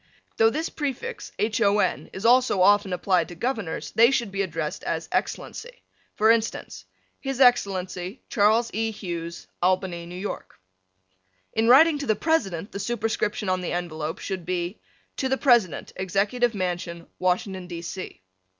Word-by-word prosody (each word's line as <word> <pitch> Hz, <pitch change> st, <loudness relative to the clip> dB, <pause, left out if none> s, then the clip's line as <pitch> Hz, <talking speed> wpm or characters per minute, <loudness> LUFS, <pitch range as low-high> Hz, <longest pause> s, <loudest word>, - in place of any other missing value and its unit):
Though 225 Hz, 0 st, +6 dB
this 310 Hz, +7 st, -2 dB
prefix 295 Hz, -, -4 dB
Hon. 210 Hz, -2 st, +1 dB
is 195 Hz, -, -7 dB
also 245 Hz, -5 st, +5 dB
often 205 Hz, 0 st, +4 dB
applied 180 Hz, -2 st, +1 dB
to 175 Hz, -, -10 dB
Governors 225 Hz, -6 st, -3 dB
they 230 Hz, +1 st, +6 dB
should 235 Hz, -6 st, 0 dB
be 195 Hz, 0 st, -1 dB
addressed 165 Hz, -5 st, -3 dB
as -, -, -2 dB
Excellency. -, -, -3 dB, 0.3 s
For 220 Hz, +1 st, +5 dB
instance: 230 Hz, -1 st, -1 dB, 0.3 s
His 270 Hz, -2 st, -4 dB
Excellency, 190 Hz, -6 st, +2 dB
Charles 220 Hz, +3 st, +3 dB
E. 225 Hz, +1 st, 0 dB
Hughes, 170 Hz, -5 st, -6 dB, 0.2 s
Albany, 185 Hz, -1 st, +1 dB
N. 175 Hz, +2 st, -8 dB
Y. -, -, -4 dB, 1.1 s
In 225 Hz, +1 st, +1 dB
writing 295 Hz, +4 st, +7 dB
to 285 Hz, -, -4 dB
the 215 Hz, -, +3 dB
President 205 Hz, -, 0 dB
the 200 Hz, -, -5 dB
superscription 220 Hz, -2 st, -1 dB
on 185 Hz, 0 st, +1 dB
the 180 Hz, -, -3 dB
envelope 160 Hz, -3 st, -3 dB
should 190 Hz, -3 st, -5 dB
be 180 Hz, +2 st, -3 dB, 0.4 s
To 265 Hz, -, -1 dB
the 265 Hz, -, +1 dB
President, 240 Hz, -, +2 dB
Executive 205 Hz, +5 st, 0 dB
Mansion, 175 Hz, -2 st, -3 dB
Washington, 185 Hz, 0 st, -1 dB
D. 170 Hz, -1 st, -6 dB
C. 185 Hz, -, -7 dB
200 Hz, 150 wpm, -25 LUFS, 180-235 Hz, 1.1 s, writing